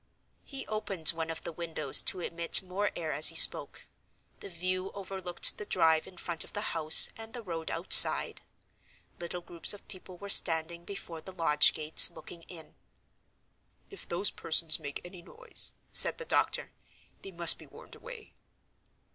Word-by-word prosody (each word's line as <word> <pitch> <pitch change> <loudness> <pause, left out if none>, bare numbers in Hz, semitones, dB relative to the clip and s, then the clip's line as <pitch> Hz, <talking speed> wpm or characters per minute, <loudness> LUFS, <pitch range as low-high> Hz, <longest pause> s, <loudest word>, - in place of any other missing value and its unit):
He 275 -2 -10
opened 200 -7 -3
one 165 -1 -3
of 165 - -10
the - - -9
windows 160 -4 +2
to 185 - -4
admit 170 +2 -2
more 190 +3 -6
air 160 -2 -8
as 150 +2 +2
he - - +1
spoke. - - +8 0.5
The - - -13
view 185 +2 -7
overlooked 190 -2 -4
the 210 - -7
drive 160 -1 -2
in 185 - -18
front 170 -1 -3
of - - -17
the 205 - -7
house 155 -1 +3
and 225 0 -15
the 240 - -11
road 165 -4 -10
outside. - - +2 0.8
Little 175 +1 -9
groups 170 +1 -1
of 205 - -21
people 185 -2 -16
were 200 - -13
standing 170 -2 +2
before 170 -5 -12
the 190 - -14
lodge 150 -4 +1
gates, 155 0 +3
looking 170 - -15
in. 165 -3 -14 1.2
"If 395 - -12
those 180 +4 -3
persons 160 0 -2
make 145 -2 -10
any 175 0 -15
noise," 170 - -5 0.2
said - - +2
the 480 - -11
doctor, - - -4 0.5
"they - - -13
must 170 -2 +4
be - - -18
warned - - -19
away." 480 -3 -15
175 Hz, 165 wpm, -26 LUFS, 165-195 Hz, 1.2 s, spoke